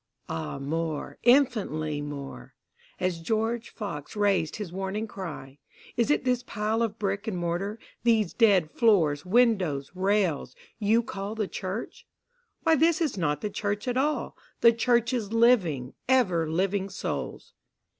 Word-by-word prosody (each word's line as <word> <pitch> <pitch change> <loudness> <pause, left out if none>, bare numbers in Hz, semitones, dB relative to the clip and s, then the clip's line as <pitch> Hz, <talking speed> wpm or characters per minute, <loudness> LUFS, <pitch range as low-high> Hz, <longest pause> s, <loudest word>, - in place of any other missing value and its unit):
Ah 160 -3 -4
more, 155 +2 -3
infinitely 215 - +2
more; 140 - -7 0.4
(As 180 -2 -1
George 225 +5 -1
Fox 175 -8 -6
rais'd 200 -6 +1
his 210 -6 -6
warning 195 +4 -3
cry, 150 -9 -8 0.4
"Is 235 +2 +1
it 295 - +2
this 250 -1 +2
pile 220 -1 -2
of 225 -2 -1
brick 200 +1 -2
and 205 -5 -2
mortar, 175 +5 -2 0.2
these 225 -6 +2
dead 195 -9 +4
floors, 180 -9 +3
windows, 185 - +2
rails, 190 -4 0 0.2
you 220 +2 +3
call 210 -4 -5
the 215 -3 -1
church? 190 +4 -6 0.6
Why 325 - +4
this 320 +2 +3
is 315 -6 0
not 150 -6 -1
the 210 - -3
church 205 +2 -2
at 245 - 0
all 290 +3 0 0.3
the 235 0 +7
church 235 +1 +2
is 225 -4 -2
living, 185 - +3 0.2
ever 185 -12 +3
living 195 +4 0
souls.") 195 - -5
200 Hz, 145 wpm, -27 LUFS, 165-230 Hz, 0.6 s, the